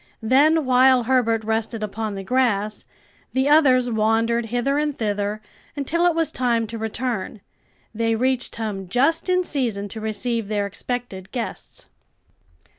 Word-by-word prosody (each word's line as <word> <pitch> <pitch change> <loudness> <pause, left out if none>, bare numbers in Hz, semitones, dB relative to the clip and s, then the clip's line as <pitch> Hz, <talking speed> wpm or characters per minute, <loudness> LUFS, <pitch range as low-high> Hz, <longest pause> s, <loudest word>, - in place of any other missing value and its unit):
Then, 295 +6 +4
while 255 0 +5
Herbert 230 -3 +1
rested 220 0 -2
upon 215 0 -4
the 195 - -5
grass 215 -3 0 0.5
the 265 +1 +1
others 270 -5 +5
wandered 225 +1 +1
hither 245 +5 0
and 295 -2 -1
thither 210 0 -2 0.3
until 330 +5 +1
it 345 - +1
was 330 -2 0
time 235 -3 0
to 230 - -4
return. 220 -2 -3 0.5
They 225 0 0
reached 255 +2 -1
home 210 -4 -4
just 300 - +1
in 365 0 +3
season 235 - -2
to 220 +2 -7
receive 225 0 -1
their 205 -1 -1
expected 200 -2 -5
guests. 240 -3 -6
235 Hz, 140 wpm, -22 LUFS, 215-260 Hz, 0.5 s, while